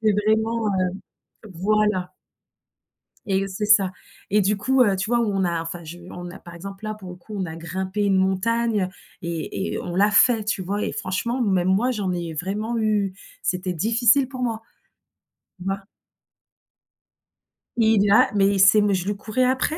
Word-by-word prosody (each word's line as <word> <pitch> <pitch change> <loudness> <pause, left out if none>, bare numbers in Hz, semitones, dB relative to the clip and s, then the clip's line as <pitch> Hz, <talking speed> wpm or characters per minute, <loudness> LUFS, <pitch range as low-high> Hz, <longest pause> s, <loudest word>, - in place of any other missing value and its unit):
C'est 215 -1 +3
vraiment, 220 +1 +1
heu - - +1 0.8
voilà 200 0 +1 1.1
Et 195 -1 +1
c'est 200 +2 -3
ça. 200 -3 +5 0.4
Et 210 +2 +4
du 205 +1 +2
coup, 260 +5 +3
heu, 200 -5 +3
tu 190 +5 -3
vois 240 0 +3
on 200 -4 0
a 170 -2 0
enfin 165 +1 -7
je 170 +3 -9
on 175 0 -7
a 185 - -10
par 170 - -12
exemple 195 +4 -9
là 215 - -3
pour 190 -4 -10
le 180 - -9
coup 210 +4 -11
on 190 - -1
a 160 -2 -6
grimpé 190 +4 -3
une 195 -1 +3
montagne 200 +2 +1 0.3
et 170 +3 -3
et - - -2
on 175 - -5
l'a 205 +3 +4
fait, 225 +1 +4
tu 205 -2 -1
vois? 200 +3 -2
Et - - -2
franchement 235 +7 -2
même 185 -4 +1
moi 205 +7 +2
j'en 205 -6 -2
ai 170 -2 -4
vraiment 205 +8 -3
eu 210 -3 0 0.3
c'était 180 0 -1
difficile 230 - +3
pour 255 -2 -6
moi, 225 -2 -2 1.0
tu - - -9
vois? 195 0 -2 2.0
Il 220 -3 +3
a 235 +5 +5
mais 195 -1 +4
il 200 -1 +1
sait 200 +2 +7
mais, 205 -1 +2
je 185 0 -2
lui 205 0 -1
courais 215 +5 -1
après! 260 +5 +1
200 Hz, 185 wpm, -23 LUFS, 185-220 Hz, 2.0 s, sait